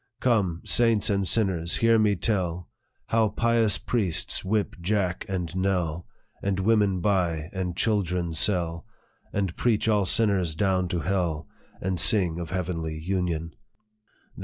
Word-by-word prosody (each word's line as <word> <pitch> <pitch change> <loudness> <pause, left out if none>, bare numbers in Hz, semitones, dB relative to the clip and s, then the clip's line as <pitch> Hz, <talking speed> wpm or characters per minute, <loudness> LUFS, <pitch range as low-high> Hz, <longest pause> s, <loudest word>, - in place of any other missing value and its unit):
" - - -59
Come, 100 -9 +1
saints 115 -3 +3
and 100 -1 +1
sinners, 90 -5 +2
hear 115 -1 +4
me 105 -2 +3
tell 90 -3 -2 0.4
How 110 -1 +2
pious 115 0 +2
priests 100 -9 -1
whip 105 +2 -1
Jack 90 -1 -1
and 90 -3 -3
Nell, 90 -3 -1 0.3
And 100 -1 -1
women 100 -2 +2
buy 85 -5 0
and 90 -2 -3
children 90 -6 0
sell, 85 -1 0 0.4
And 95 -4 -2
preach 115 -3 +1
all 105 -3 +2
sinners 95 -8 +1
down 95 -1 +1
to 85 -1 -2
hell, 85 -2 -1 0.3
And 95 -1 -2
sing 90 -5 +3
of 85 -2 -5
heavenly 85 -3 -3
union. 85 -1 -2
95 Hz, 135 wpm, -26 LUFS, 85-105 Hz, 0.4 s, hear